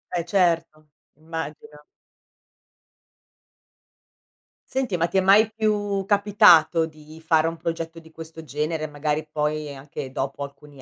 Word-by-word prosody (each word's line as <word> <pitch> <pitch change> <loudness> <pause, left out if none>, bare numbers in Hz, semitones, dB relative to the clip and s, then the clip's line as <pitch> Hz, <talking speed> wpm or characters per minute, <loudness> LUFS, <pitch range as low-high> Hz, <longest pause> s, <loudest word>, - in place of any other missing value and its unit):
Eh, 170 - 0
certo, 165 -4 0 0.3
immagino. 155 -1 -8 2.9
Senti, 255 -8 -1
ma 170 0 +1
ti - - -11
è 190 - +5
mai 205 +3 +5
più 205 -3 0
capitato 195 -6 +5
di 155 0 -14
fare 160 0 +3
un 165 - -3
progetto 165 0 -5
di 160 -1 -17
questo 160 0 -10
genere? 155 +1 -3
Magari 150 +1 -2
poi 150 -1 -2
anche 135 -1 -8
dopo 135 +2 -4
alcuni 140 0 -12
160 Hz, 120 wpm, -24 LUFS, 150-175 Hz, 2.9 s, è